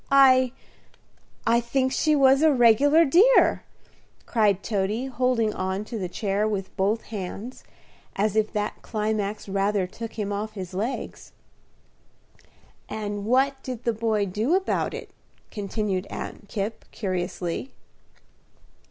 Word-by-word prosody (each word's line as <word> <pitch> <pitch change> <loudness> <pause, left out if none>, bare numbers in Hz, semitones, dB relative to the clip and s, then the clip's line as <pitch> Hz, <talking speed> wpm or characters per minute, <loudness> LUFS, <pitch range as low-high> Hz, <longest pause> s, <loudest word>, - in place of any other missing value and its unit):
"I 260 -2 +6 0.9
I 230 +1 +4
think 260 +2 0
she 305 +2 +2
was 270 0 +5
a 315 -1 +5
regular 275 +6 +5
dear," 390 - +5 0.6
cried 210 -4 +2
Toady, 210 +3 -1
holding 250 -4 0
on 190 +2 -3
to 225 0 -5
the 185 -2 -3
chair 200 +3 -1
with 195 -3 -4
both 205 +3 0
hands, 210 +4 -7 0.5
as 210 +1 0
if 215 -1 +1
that 210 0 -3
climax 215 -1 -2
rather 195 0 +1
took 225 +4 -8
him 205 -2 -3
off 215 +2 -4
his 185 -3 -7
legs. 220 +8 -4 1.6
"And 205 -1 -4
what 265 +3 +2
did 250 -3 -6
the 235 - +1
boy 220 -2 0
do 215 - 0
about 380 0 0
it?" - - -8 0.4
continued 200 -2 -2
Aunt 205 - -7
Kipp, 210 +1 -4
curiously. 180 +2 -3
215 Hz, 125 wpm, -25 LUFS, 200-255 Hz, 1.6 s, I